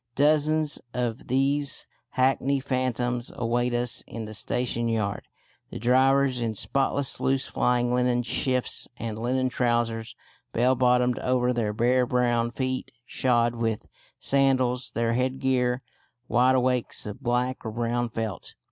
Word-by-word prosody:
Dozens 150 +1 +2 0.2
of 120 -2 -2
these 135 +2 +1 0.3
hackney 135 +1 +2
phantoms 125 -2 -1
await 120 +1 0
us 120 0 -1
in 115 -1 -6
the 110 - -8
station 120 +2 -1
yard; 110 -3 -2 0.4
the - - -7
drivers 130 +2 +3
in 115 -2 -1
spotless 135 +4 -1
loose 135 0 +1
flying 120 0 +1
linen 125 -1 +2
shifts 130 +1 0
and 110 -2 -5
linen 130 +2 0
trousers 120 -2 -1 0.4
bell 125 +3 +3
bottomed 125 -1 +2
over 125 0 +1
their 115 -3 0
bare 125 +3 +2
brown 120 -2 +1
feet 130 +1 -3 0.2
shod 120 -3 +1
with 115 -2 -2 0.3
sandals, 130 -2 +1
their 115 0 0
headgear 130 0 0 0.4
wideawakes 125 0 +2
of 105 +5 -7
black 125 +1 -1
or 110 - -3
brown 120 +2 -1
felt. 110 -4 -5
125 Hz, 130 wpm, -26 LUFS, 120-130 Hz, 0.4 s, drivers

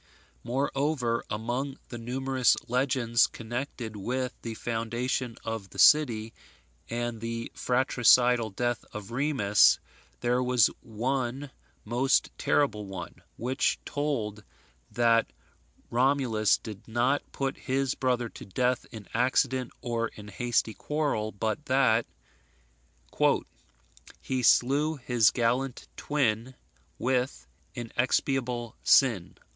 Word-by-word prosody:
Moreover, 135 -2 0
among 125 +6 -3
the 120 - -7
numerous 130 +1 +1
legends 125 -2 +2
connected 120 -1 -5
with 125 +5 -2
the 115 -1 -5
foundation 120 +2 -2
of 115 -4 -5
the - - -13
city, 115 -7 +5 0.6
and 120 -1 -3
the 115 0 -4
fratricidal 125 -2 +3
death 120 +4 -2
of 105 0 -7
Remus, 120 -6 +4 0.4
there 125 +1 +1
was 125 -3 +4
one 130 +3 -3 0.3
most 125 +5 +2
terrible 105 -8 +1
one, 95 -2 -7 0.2
which 130 +3 0
told 115 -8 -2 0.5
that 115 -1 +2 0.6
Romulus 125 -4 +2
did 110 -1 -10
not 120 +5 +1
put 135 -1 -2
his 135 0 -1
brother 125 -2 0
to - - -11
death 125 +6 -1
in 110 -4 -10
accident, 130 +1 +1
or 115 -1 -1
in 105 -2 -12
hasty 115 +1 0
quarrel, 145 -8 -2
but 110 +8 -3
that 130 -4 +3 2.1
"He 130 -1 -2
slew 140 +6 +3
his 120 -5 +3
gallant 125 +2 -1
twin 130 -3 -1 0.4
With 125 +1 -1 0.3
inexpiable 120 0 -1
sin." 110 -10 +3
120 Hz, 105 wpm, -28 LUFS, 115-130 Hz, 2.1 s, city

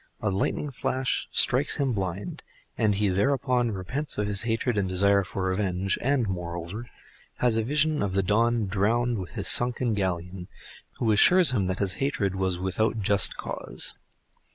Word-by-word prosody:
A 105 - -1
lightning 120 +9 -2
flash 130 0 -2
strikes 135 +4 +2
him 135 -4 0
blind, 95 -1 -4 0.3
and 105 -2 +1
he 105 +1 +1
thereupon 125 +4 +1
repents 125 +9 -3
him 105 - 0
of - - -3
his 100 -1 -2
hatred 115 +1 -1
and 100 -2 0
desire 100 +2 +3
of 95 - -6
revenge, 95 0 -1
and, 130 -3 +1
moreover, 90 +4 -5 0.5
has 120 -3 +2
a 115 - +1
vision 150 +4 +1
of 100 -2 -1
the 95 0 +1
Don 115 +3 +1
drowned 110 +4 0
with 90 - -8
his - - -1
sunken 120 -1 +2
galleon, 90 -2 -3 0.5
who 115 -3 +1
assures 170 - +5
him 100 -7 0
that 95 0 -2
his 95 -3 0
hatred 105 -9 0
was 95 -2 -1
without 100 +5 -1
just 100 -2 +3
cause. - - -3
105 Hz, 170 wpm, -26 LUFS, 95-120 Hz, 0.5 s, assures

